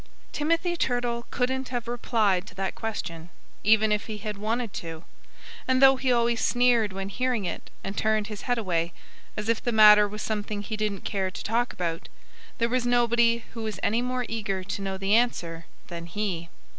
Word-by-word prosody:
Timothy 330 +3 0
Turtle 245 -5 -1
couldn't 260 +1 -1
have 245 -2 -3
replied 215 -6 +1
to - - -12
that 195 0 -2
question, 175 -7 -5 0.3
even 220 +1 +4
if 210 0 0
he 215 -2 -5
had 210 0 -5
wanted 220 +2 -2
to. 165 0 -6 0.6
And 260 0 +3
though 270 0 +8
he 260 0 0
always 235 -1 +2
sneered 240 -4 +3
when 195 0 -4
hearing 245 -1 -1
it 175 - -5
and 195 - -4
turned 215 0 +1
his 210 -1 -7
head 245 -1 0
away, 170 -5 -1 0.4
as 210 0 -3
if 230 -1 +1
the 240 - 0
matter 210 -1 +8
was 210 +1 -6
something 210 -1 -3
he 215 +1 -4
didn't 210 -2 -2
care 190 -2 -1
to - - -8
talk 235 +3 0
about, 165 -2 -4 0.5
there 235 - +2
was 250 +1 0
nobody 235 -1 +3
who 230 - -6
was 215 -4 -4
any 225 +3 +2
more 250 0 -2
eager 210 -4 -2
to 195 +1 -4
know 195 -1 -3
the 195 +1 0
answer 170 -9 0 0.2
than 170 0 -7
he. 175 -2 -3
215 Hz, 190 wpm, -26 LUFS, 195-240 Hz, 0.6 s, though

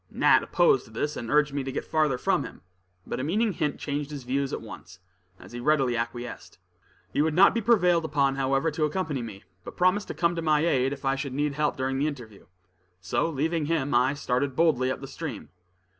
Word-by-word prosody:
Nat - - +4
opposed 455 -5 +2
this, 150 +1 -2
and 115 - -6
urged 150 0 +3
me 140 -1 -2
to 135 - -4
get - - -4
farther 155 -5 +1
from - - +1
him; - - -10 0.4
but - - -4
a - - -2
meaning 210 +9 +1
hint 150 -3 -2
changed 145 0 -3
his 145 -3 -7
views 135 +2 -1
at - - -3
once, 100 -4 -11 0.4
and - - -14
he 120 - -6
readily 135 -2 +2
acquiesced. 120 +1 -5 0.6
He - - +2
would 155 0 +1
not 195 +3 +6
be 230 - 0
prevailed 180 -7 +3
upon, 140 -3 +1
however, 135 +3 +1
to 155 +1 0
accompany 150 -4 -2
me, 110 -4 -8 0.2
but - - -10
promised 185 +3 +2
to - - -6
come 170 0 +1
to 165 - -2
my 155 -1 +2
aid 135 -5 +2
if 140 -1 -7
I 135 0 +2
should 135 -1 -4
need 145 0 0
help 150 +1 -1
during 135 0 -1
the 145 - +1
interview. 120 -9 -8 0.5
So 95 - -1
leaving 160 +1 -1
him, 150 -4 0
I 125 +4 +3
started 135 -1 -1
boldly 135 -6 +2
up 130 - -3
the 135 - -7
stream. 135 - -7
145 Hz, 220 wpm, -26 LUFS, 130-160 Hz, 0.6 s, not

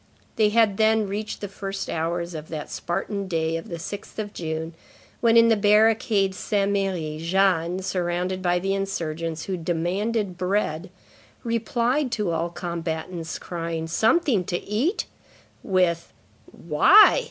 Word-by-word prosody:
They 215 -2 +3
had 215 -2 +3
then 220 -1 +3
reached 210 +2 -4
the 205 - -3
first 195 0 -5
hours 170 +2 -2
of 155 -1 -7
that 155 -2 -6
Spartan 195 +3 -3
day 165 -2 -1
of 165 - -6
the 170 - -4
6th 200 +5 -8
of 210 -1 -4
June 160 0 -4 0.5
when, 230 -1 +4
in 230 0 +7
the 225 - +5
barricade 210 -1 +3
Saint 200 +1 0
Merry, 180 -6 -2
Jeanne, 180 0 +1
surrounded 180 0 -2
by 175 -1 +2
the 195 +2 -1
insurgents 165 -4 -3
who 190 -2 -3
demanded 185 +4 -1
bread, 180 -2 -1 0.5
replied 235 +4 0
to 210 -6 -1
all 165 +1 -1
combatants 170 -1 -4
crying: 165 -2 -4
"Something 225 - +2
to 175 - -1
eat!" 255 - -1 0.6
with: 180 -4 +1 0.4
"Why? 170 - +6
185 Hz, 140 wpm, -24 LUFS, 170-210 Hz, 0.6 s, in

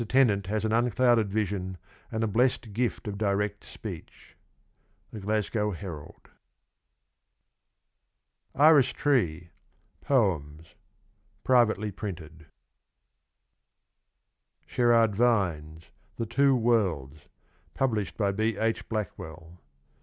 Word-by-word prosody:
Tennant 105 -8 +3
has 110 +2 -1
an 110 - 0
unclouded 120 -2 +2
vision 95 -3 -2 0.3
and 110 0 -2
a - - +1
blessed 115 0 0
gift 120 0 -2
of 100 -1 -5
direct 105 -1 -1
speech. - - -10 0.4
— - - -42
The 110 - -6
Glasgow 105 +1 -1
Herald. 85 -5 -9 2.3
Iris 145 -3 +6
Tree. 90 - 0 0.5
POEMS. 80 - 0 0.7
Privately 110 -4 +2
printed. 80 -6 -8 2.2
Sherard 115 -3 +3
Vines. 85 -9 0 0.2
THE 115 - -3
TWO 135 +4 +3
WORLDS. 90 - 0 0.5
Published 110 -7 -1
by 100 -3 +1
B. 110 +1 -1
H. 110 +1 -1
Blackwell. 85 -6 -6
105 Hz, 95 wpm, -27 LUFS, 90-120 Hz, 2.3 s, Iris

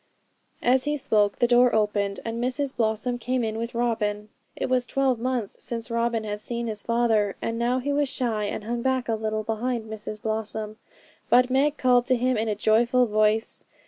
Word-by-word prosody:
As 255 +2 +4
he 295 0 0
spoke 210 -6 +1
the - - +3
door 245 0 +4
opened, 205 -2 0
and 230 +1 -3
Mrs 265 +2 -1
Blossom 225 +2 -1
came 250 +1 -1
in 220 0 -2
with 230 +1 -4
Robin. 215 -3 -1 0.3
It - - -2
was 250 -1 +1
twelve 265 -3 +1
months 245 -4 -2
since 230 0 -4
Robin 230 -1 0
had 210 -1 -4
seen 235 +1 -3
his 215 -2 -3
father, 225 -3 +1
and 230 0 -3
now 240 +2 +1
he 280 +3 -1
was 290 -1 +1
shy, 230 -6 -1
and 205 - -4
hung 235 +2 -3
back 260 0 0
a 230 - 0
little 215 0 -2
behind 225 +1 -2
Mrs 215 -1 -6
Blossom; 215 0 -3 0.5
but 250 +1 +4
Meg 285 +3 +2
called 245 -1 +3
to 255 - +4
him 255 +1 +1
in 220 0 -1
a 210 - 0
joyful 235 +4 +3
voice. 215 0 +1
230 Hz, 195 wpm, -25 LUFS, 215-250 Hz, 0.5 s, As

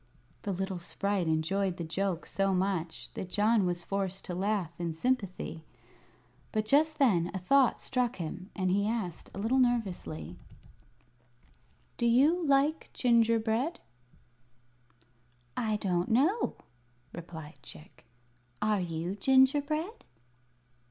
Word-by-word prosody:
The 200 - -3
little 190 0 -3
sprite 195 +1 -1
enjoyed 175 +4 0
the 170 - -4
joke 180 +1 -2
so 195 -1 0
much 180 -3 -2
that 185 - -6
John 210 0 +3
was 175 -1 -2
forced 195 -1 -2
to 180 - -4
laugh 190 -2 -1
in 170 -2 -2
sympathy. 190 -6 -2 0.9
But 215 0 0
just 305 +6 +3
then 185 - +3
a - - 0
thought 260 +8 +3
struck 250 -2 -1
him, 180 +3 -6
and 185 -3 0
he 200 +2 +2
asked, 215 -8 -3
a - - -10
little 225 +6 +1
nervously: 180 - -1 1.6
"Do 235 - +1
you 290 +9 +4
like 280 +3 +2
gingerbread?" 230 +4 +2 1.8
"I 215 -2 0
don't 180 -4 0
know," 310 - +2 0.6
replied 160 -2 -9
Chick. 155 - -12 0.6
"Are 210 -1 +2
you 170 +1 -3
gingerbread?" 285 - +2
200 Hz, 120 wpm, -30 LUFS, 175-245 Hz, 1.8 s, you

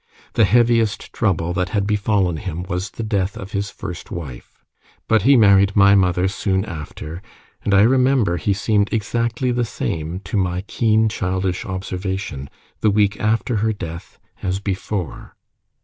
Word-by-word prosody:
The 115 - +4
heaviest 115 0 +2
trouble 90 -5 0
that 90 -1 -1
had 100 -2 0
befallen 100 -4 +1
him 90 -3 -5
was 90 +1 -3
the 115 - -6
death 100 -3 -1
of 95 +1 -8
his 100 0 -2
first 90 -4 -8
wife. 70 -8 -9 0.4
But 110 -2 +3
he 135 +6 +5
married 100 -3 +5
my 100 0 +6
mother 90 -2 +3
soon 95 0 -1
after; 80 -2 -7 0.4
and - - -1
I 100 0 +6
remember 125 -6 +3
he 85 +6 -1
seemed 100 +1 +1
exactly 115 +3 -1
the 120 0 0
same, 85 -6 -3
to 100 +2 -3
my 90 -2 0
keen 110 +1 +2
childish 95 -2 -2
observation, 95 -6 -4 0.3
the 110 - +3
week 105 0 +2
after 110 +2 0
her 110 +2 +1
death 85 -4 -8 0.2
as 95 0 -1
before. 100 -2 -4
100 Hz, 155 wpm, -20 LUFS, 90-110 Hz, 0.4 s, my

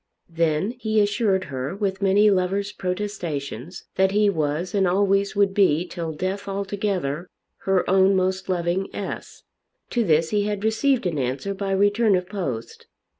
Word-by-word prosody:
Then 165 +4 +1
he 220 -2 +1
assured 205 -2 +2
her 135 0 -4
with 195 -1 -2
many 200 +2 +4
lover's 195 +2 0
protestations 180 - -4
that 190 0 +4
he 205 +1 +3
was 155 +1 -2
and 195 -2 +2
always 195 +2 +2
would 200 -1 +3
be 180 -5 +3
till 170 -2 -5
death 190 +5 -3
altogether 195 -5 -2 0.4
her 190 -1 +2
own 190 +1 +4
most 190 0 0
loving 180 +1 0
S. - - -6 0.5
To 240 - +1
this 160 -3 +2
he 205 -1 +1
had 205 -1 -2
received 235 +3 +1
an 165 -5 -1
answer 135 +10 -2
by 195 0 -4
return 205 +2 +3
of 180 0 -1
post. 140 - -5
190 Hz, 155 wpm, -23 LUFS, 170-205 Hz, 0.5 s, many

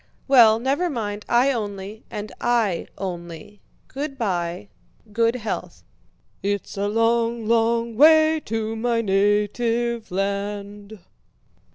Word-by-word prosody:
"Well, 235 -5 +7
never 275 +9 0
mind; 210 -6 -4
I 250 +3 +4
only..." 205 -2 -5
"And 210 0 -6
I 230 -7 +1
only..." 175 +1 -7 0.3
"Good 275 0 -5
by." 175 - -2 0.4
"Good 230 +2 +2
health..." 225 -4 -5 0.6
"It's 200 0 -3
a 200 0 -1
long, 230 +1 +1
long 230 0 +1
way. 315 +3 +6
To 225 0 -3
my 230 0 0
native 220 +3 0
land..." 200 +2 -4
220 Hz, 105 wpm, -23 LUFS, 205-235 Hz, 0.6 s, Well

